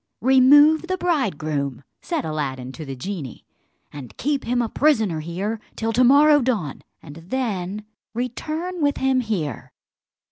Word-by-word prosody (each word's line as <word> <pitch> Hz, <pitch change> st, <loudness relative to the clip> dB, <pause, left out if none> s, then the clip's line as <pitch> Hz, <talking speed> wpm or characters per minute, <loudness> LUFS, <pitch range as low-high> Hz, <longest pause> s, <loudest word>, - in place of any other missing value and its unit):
"Remove 290 Hz, +6 st, +6 dB
the 370 Hz, 0 st, -1 dB
bridegroom," 155 Hz, -, -1 dB, 0.2 s
said 335 Hz, -, -3 dB
Aladdin 135 Hz, -5 st, -4 dB
to 155 Hz, +3 st, -9 dB
the 135 Hz, -1 st, -6 dB
genie, 140 Hz, -, -7 dB, 0.5 s
"and 140 Hz, -4 st, -10 dB
keep 285 Hz, 0 st, -1 dB
him 245 Hz, +1 st, 0 dB
a 240 Hz, -, +1 dB
prisoner 220 Hz, -, +1 dB, 0.5 s
till 225 Hz, 0 st, -2 dB
to 250 Hz, +3 st, +4 dB
morrow 290 Hz, +3 st, +6 dB
dawn, 215 Hz, -, -2 dB, 0.2 s
and 145 Hz, +2 st, -11 dB
then 200 Hz, 0 st, -3 dB, 0.3 s
return 310 Hz, +9 st, -4 dB
with 285 Hz, -1 st, +1 dB
him 265 Hz, -1 st, +2 dB
here." 185 Hz, -, -3 dB
230 Hz, 135 wpm, -22 LUFS, -, 0.5 s, Remove